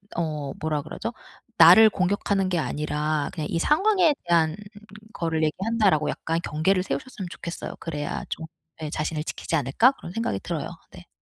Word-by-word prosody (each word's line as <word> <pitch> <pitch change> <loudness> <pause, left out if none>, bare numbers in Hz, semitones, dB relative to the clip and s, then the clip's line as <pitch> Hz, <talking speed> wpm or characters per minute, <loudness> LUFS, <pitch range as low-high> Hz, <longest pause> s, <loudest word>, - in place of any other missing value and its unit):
어 155 -4 -2
뭐라 155 -1 -1
그러죠? 190 +10 -6 0.5
나를 180 +7 +9
공격하는 195 0 0
게 180 - 0
아니라 150 0 -1
그냥 155 -3 -3
'이 165 - -1
상황에 360 - +3
대한 165 -2 +3 0.6
거를 165 -3 -1
얘기한다.'라고 190 -2 +1
약간 165 +1 -2
경계를 180 +5 +2
세우셨으면 200 -2 -5
좋겠어요. 170 -2 -6
그래야 150 -3 -4
좀 160 - -4 0.3
예 155 -2 -5
'자신을 155 0 -2
지키지 165 - -3
않을까?' 150 - +4
그런 175 - -10
생각이 225 - -2
들어요. - - -4 0.2
네. - - -14
165 Hz, 370 characters per minute, -25 LUFS, 155-195 Hz, 0.6 s, 나를